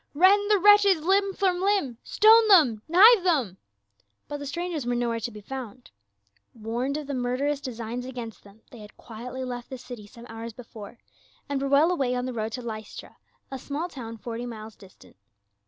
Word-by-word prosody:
" - - -48
Rend 400 +5 +4
the 420 - +5
wretches 400 -3 +5
limb 390 +3 +2
from 365 -2 0
limb! 380 - 0
Stone 445 +1 +5
them! 295 - +5
Knive 400 +4 +7
them 270 - 0 0.4
!" 100 +1 -45
But 290 - -5
the 285 0 -7
strangers 340 0 -4
were 245 0 -1
nowhere 235 -1 -1
to 230 - -4
be 210 -2 -11
found; 255 0 -9 0.6
warned 240 +5 -3
of 305 - -6
the 280 - -5
murderous 260 +3 -1
designs 240 -2 -5
against 240 -4 -8
them, 205 +2 -19
they 240 - -12
had 210 0 -14
quietly 245 +3 -8
left 245 -1 -6
the 260 - -7
city 245 -4 -10
some 235 +3 -14
hours 225 0 -8
before 225 -2 -11 0.5
and 280 -2 -2
were 275 - -1
well 290 +5 +4
away 265 -8 0
on 250 0 -2
the 255 - -4
road 220 -1 -3
to 250 - -5
Lystra, 220 -2 -8 0.3
a 265 - -5
small 290 +6 -4
town 230 -7 -8
forty 235 +2 -6
miles 220 -2 -9
distant. 190 - -18
250 Hz, 195 wpm, -26 LUFS, 230-320 Hz, 0.6 s, Knive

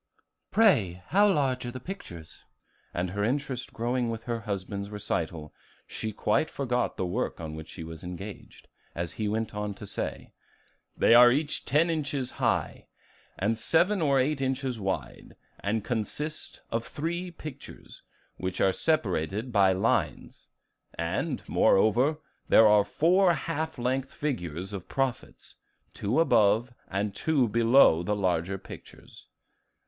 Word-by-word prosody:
"Pray, 105 - +3
how 205 +2 +5
large 135 -7 0
are 120 - -4
the 130 - -7
pictures?" 90 - -9 0.5
and 90 +1 -2
her 100 +1 -2
interest 130 +1 -2
growing 120 +1 -1
with 115 0 -5
her 120 -1 -3
husband's 100 -1 -4
recital, 85 -7 -3 0.3
she 110 - -5
quite 105 +8 +1
forgot 125 -3 -1
the 95 - -1
work 90 - -2
on 80 -2 -6
which 80 0 -8
she 85 - -8
was 80 -1 -9
engaged, 95 +3 -9 0.3
as 85 -1 -3
he 110 - -3
went 110 +1 -2
on 105 -1 -3
to 105 - -9
say, - - -5 0.6
"They - - +5
are 120 +1 +9
each 145 +3 -1
ten 160 +4 +3
inches 145 -5 -2
high - - -1 0.5
and 105 +4 +1
seven 175 - +3
or 140 -3 +3
eight 135 +2 0
inches 130 -2 -1
wide, 95 -1 -4 0.2
and 105 +1 -1
consist 125 +7 -3
of 115 0 -1
three 175 +7 -4
pictures 155 -5 -11 0.4
which 95 0 -4
are 95 - +3
separated 105 - 0
by 100 -4 +4
lines; 95 0 -1 0.5
and, 85 0 -2
moreover, 120 +10 +3 0.3
there 110 - +7
are 105 -1 +6
four 175 - +3
half 160 +1 -3
length 130 +2 -1
figures 95 - -4
of 95 -3 -7
prophets, 135 -2 -3 0.4
two 105 +9 0
above 115 -4 +3
and 100 +1 -2
two 140 +1 +1
below 115 -5 +5
the 105 +4 -1
larger 95 -1 0
pictures. - - -13
115 Hz, 140 wpm, -28 LUFS, 95-140 Hz, 0.6 s, are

